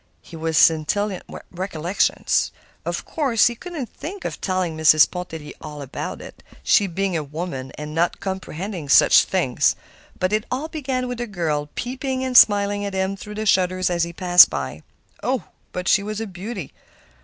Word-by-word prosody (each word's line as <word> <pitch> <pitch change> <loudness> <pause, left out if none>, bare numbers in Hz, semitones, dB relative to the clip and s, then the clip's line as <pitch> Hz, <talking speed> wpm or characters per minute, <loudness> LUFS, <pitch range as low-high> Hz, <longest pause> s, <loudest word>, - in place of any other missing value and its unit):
He 170 - -12
was 160 -1 -1
scintillant 180 +5 +2
with - - -9
recollections. 180 0 0 0.3
Of - - -3
course, 265 -8 +2
he 240 - +3
couldn't 320 +2 -6
think 375 +5 -8
of - - -5
telling 185 -4 -1
Mrs. 155 -1 +6
Pontellier 160 -4 -7
all 150 -1 -8
about 135 - -6
it, - - -12 0.2
she 205 - +4
being 190 +1 -2
a 155 - -1
woman 145 -3 -6
and 150 0 -6
not 165 +2 0
comprehending 190 -3 -5
such - - +7
things. - - +1 0.4
But 185 +2 0
it 215 0 0
all 275 +5 -3
began 260 -5 -3
with 245 -1 -4
a 240 - -3
girl 155 -7 -2
peeping 260 +1 -3
and 255 -1 -3
smiling 205 -2 +5
at 200 -1 -4
him 190 +1 -1
through 210 +2 -9
the 215 +1 -3
shutters 185 -2 +2
as 170 -1 +1
he 170 - -3
passed 180 +1 +7
by. 70 +4 -5 0.4
Oh! - - -1 0.3
but 180 0 -5
she 195 - +4
was 210 +1 -4
a 225 - -3
beauty! 190 - -7
185 Hz, 180 wpm, -22 LUFS, 165-215 Hz, 0.4 s, such